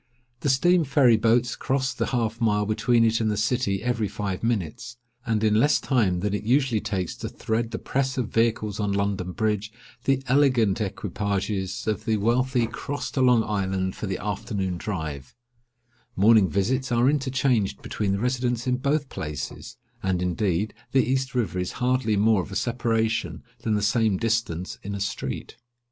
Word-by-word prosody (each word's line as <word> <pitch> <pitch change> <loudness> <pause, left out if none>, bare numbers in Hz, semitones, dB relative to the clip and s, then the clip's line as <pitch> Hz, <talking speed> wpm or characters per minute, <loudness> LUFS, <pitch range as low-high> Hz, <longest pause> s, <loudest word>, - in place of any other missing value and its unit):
The 145 - -1
steam 175 +6 +4
ferry 135 -4 +4
boats 115 +3 +2
cross 135 0 -1
the - - -2
half 115 -2 -1
mile 105 -2 +2
between 115 +2 +2
it 115 0 +2
and 110 - +1
the 105 - -1
city 105 -2 0
every 120 -3 0
five 100 -2 -4
minutes; 115 +1 -2 0.3
and 110 -1 +1
in 110 -1 +3
less 145 +5 +4
time 100 -10 +1
than 100 +1 -1
it 105 - -1
usually 120 0 +2
takes 95 -4 -3
to - - -5
thread 115 +1 -2
the - - -4
press 135 0 -1
of 125 -3 -1
vehicles 110 -2 0
on 100 -1 0
London 100 -2 -1
Bridge, 105 +1 -1 0.3
the 135 0 +2
elegant 125 -6 +3
equipages 100 -1 -2
of 110 -1 -2
the 110 -1 +1
wealthy 120 +3 +1
cross 145 +5 -5
to 135 - -1
Long 125 -3 +5
Island 95 -3 -1
for 105 - -5
the 95 - -2
afternoon 100 -2 -3
drive; 80 -10 -5 0.8
morning 105 -1 +5
visits 130 - 0
are 120 +1 +3
interchanged 130 -6 +1
between 100 -2 -1
the 100 - -1
residents 125 0 -1
in 125 -1 +1
both 140 +2 0
places—and, 80 - -5
indeed, 90 +2 0 0.2
the 135 - +4
east 130 +1 -1
river 95 -7 0
is 90 - -3
hardly 125 -4 +1
more 105 -1 +4
of 90 - -9
a - - -6
separation 115 -1 -1 0.2
than 110 - 0
the 105 - 0
same 110 -2 +2
distance 110 -6 -1
in 100 +1 -5
a - - -4
street. 100 +1 -4
110 Hz, 170 wpm, -25 LUFS, 100-125 Hz, 0.8 s, Long